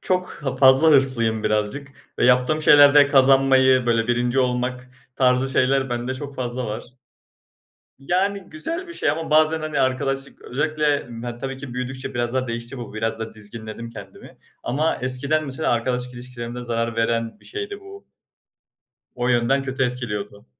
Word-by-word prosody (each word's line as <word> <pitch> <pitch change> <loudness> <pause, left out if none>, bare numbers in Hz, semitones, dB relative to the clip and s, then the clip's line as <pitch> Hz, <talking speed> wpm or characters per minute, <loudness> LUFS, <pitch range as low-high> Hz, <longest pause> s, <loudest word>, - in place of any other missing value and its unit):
çok 185 0 -1
ha 135 -2 -3
fazla 130 +4 +6
hırslıyım 120 -6 +3
birazcık 110 +6 -1 0.3
ve - - +2
yaptığım 125 +5 +3
şeylerde 145 -1 +7
kazanmayı, 135 -2 +4
böyle, 115 -1 +1
1'inci 120 +1 0
olmak 125 0 -1 0.3
tarzı 125 0 +2
şeyler 135 0 +1
bende 120 +2 -3
çok 140 +1 -7
fazla 125 -1 -4
var. 110 +2 -5 1.1
Yani, 190 +8 0
güzel 330 - -4
bir 340 - -8
şey 145 - 0
ama 160 +2 -4
bazen, 155 +1 +4
hani, 155 -2 -2
arkadaşlık, 135 +1 -1
özellikle, 155 +4 -3 0.4
yani, 120 0 -6
tabii 135 +1 -5
ki 130 -2 -8
büyüdükçe 130 +1 -5
biraz 120 0 -2
daha 130 0 0
değişti 115 +2 -5
bu. 120 -3 -8
Biraz 110 +1 -2
da 110 0 -6
dizginledim 110 +2 -8
kendimi 115 - -12 0.2
ama 150 +6 0
eskiden 135 +5 0
mesela 140 +2 -2
arkadaşlık 125 +1 -2
ilişkilerimde 120 0 -7
zarar 115 -1 -2
veren 115 - -1
bir - - -22
şeydi 410 -1 -6
bu. 395 0 -13 1.1
O 125 0 -2
yönden 120 +3 +2
kötü 130 0 -3
etkiliyordu. 105 -5 -4
130 Hz, 155 wpm, -22 LUFS, 120-140 Hz, 1.1 s, şeylerde